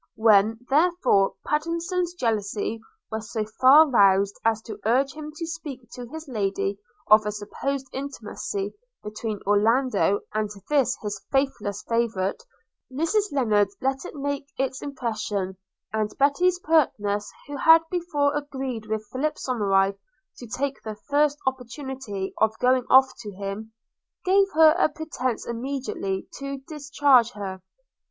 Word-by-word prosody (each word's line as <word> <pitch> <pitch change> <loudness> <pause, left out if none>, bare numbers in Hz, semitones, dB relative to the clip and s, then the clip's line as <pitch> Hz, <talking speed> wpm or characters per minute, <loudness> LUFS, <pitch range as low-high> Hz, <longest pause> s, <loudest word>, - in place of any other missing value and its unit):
When, 220 0 +4
therefore, 305 - +3
Pattenson's 335 +3 -1
jealousy 220 - -1 0.3
was 220 0 -5
so 220 -2 -1
far 260 +8 +6
roused 200 -5 +4
as 225 -1 +2
to 215 -3 -8
urge 260 +5 +2
him 305 0 -7
to 330 - -4
speak 295 -7 -7
to 245 -1 -8
his 320 +4 -9
Lady 200 -4 -2 0.3
of 215 0 +8
a - - 0
supposed 260 +6 -4
intimacy 215 -7 -5 0.3
between 210 0 -5
Orlando 210 0 +2
and 215 -1 -1 0.2
this 280 -4 +3
his 205 -2 -4
faithless 270 -7 -1
favourite, 230 - 0 0.5
Mrs 365 +10 0
Lennard 215 -7 +3
let 270 0 -1
it - - -8
make 285 0 -3
its 265 -1 -2
impression; 215 -8 -3 0.4
and 215 -1 0
Betty's 340 +6 +3
pertness 210 - +1
who 285 0 -6
had 325 +3 +7
before 305 -5 0
agreed 265 -6 -4
with 215 0 -3
Philip 300 +4 -1
Somerive 195 -5 +1 0.4
to 245 - -9
take 265 +4 -3
the 215 -1 -6 0.2
first 290 0 +3
opportunity 255 -5 -4
of 220 0 +2
going 250 0 +2
off 265 0 +6
to 210 -3 -7
him, 200 +3 -6 0.5
gave 390 +1 +4
her 315 -1 +7
a - - +4
pretence 260 -8 -3
immediately 235 -6 -3
to 275 0 -4
discharge 285 -5 +3
her. 190 -2 -6
250 Hz, 135 wpm, -25 LUFS, 210-285 Hz, 0.5 s, of